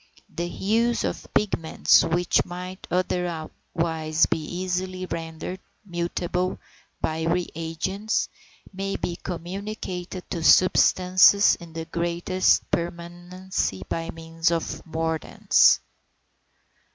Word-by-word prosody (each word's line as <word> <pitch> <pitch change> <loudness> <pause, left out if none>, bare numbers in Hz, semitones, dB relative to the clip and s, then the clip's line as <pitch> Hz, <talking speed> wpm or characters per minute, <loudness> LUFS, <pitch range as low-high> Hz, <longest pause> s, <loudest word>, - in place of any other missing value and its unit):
The 170 +2 -2
hues 230 +6 +1
of - - -4
pigments 165 -6 +3
which 175 +2 +2
might 180 +1 -8
otherwise 165 -2 -1
be - - -1
easily 185 +3 -3
rendered 165 +2 -5 0.3
mutable 175 0 -2 0.4
by 160 0 -2
re 175 +1 +1
agents, 190 +6 -2 0.5
may 195 +1 -3
be 175 - -3
communicated 185 0 -6
to 170 -3 -3
substances 185 +2 +6
in 170 -2 -8
the 165 0 -5
greatest 170 +2 +1
permanency 175 - -3
by 165 0 -3
means 165 0 -1
of 170 -1 0 0.2
mordants. 160 0 +3
175 Hz, 95 wpm, -25 LUFS, 165-185 Hz, 0.5 s, substances